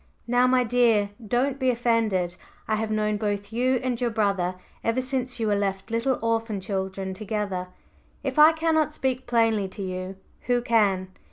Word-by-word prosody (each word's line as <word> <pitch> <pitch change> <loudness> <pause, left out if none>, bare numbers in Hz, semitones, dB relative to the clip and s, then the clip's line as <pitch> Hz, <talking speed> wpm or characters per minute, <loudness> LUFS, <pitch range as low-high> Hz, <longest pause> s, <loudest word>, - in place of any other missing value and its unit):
"Now, 245 +1 +3
my 255 0 +4
dear, 225 -4 +3
don't 255 +5 0
be 260 -1 +2
offended. 225 -7 +1 0.3
I 220 - +1
have 220 0 -2
known 215 -1 0
both 205 0 -3
you 255 +3 +2
and 250 -2 -2
your 245 - +2
brother 200 -5 0 0.3
ever 230 +2 +1
since 255 -1 -2
you 225 - 0
were 210 -1 +2
left 195 +1 -2
little 240 +3 +1
orphan 225 -2 0
children 190 0 -3
together; 205 -3 -3 0.6
if - - -1
I 305 +1 +9
cannot 315 -1 +1
speak 260 -1 -2
plainly 225 -4 +2
to 195 +1 -7
you, 185 0 -5 0.3
who 245 -1 +2
can? 200 -6 +2
225 Hz, 170 wpm, -25 LUFS, 200-245 Hz, 0.6 s, I